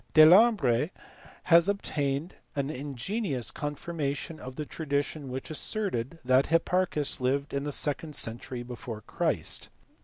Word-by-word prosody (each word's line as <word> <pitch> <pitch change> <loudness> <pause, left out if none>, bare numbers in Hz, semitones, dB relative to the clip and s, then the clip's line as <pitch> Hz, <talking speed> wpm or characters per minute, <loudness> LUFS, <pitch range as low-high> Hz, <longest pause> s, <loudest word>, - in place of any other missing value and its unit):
Delambre 155 - +6 0.5
has 170 +1 +5
obtained 150 -5 -1 0.2
an 140 +1 -1
ingenious 140 - -3
confirmation 150 +1 -4
of 130 0 -8
the 150 - -4
tradi 145 -2 -1
tion 145 -2 -7
which 130 +5 -5
asserted 165 - -1
that 130 +2 +4
Hipparchns 165 -2 +2
lived 140 +3 0
in 140 +1 -2
the 145 - -2
second 150 +2 0
century 120 +1 -2
before 120 -2 -7
Christ. - - -1
145 Hz, 125 wpm, -28 LUFS, 130-165 Hz, 0.5 s, Delambre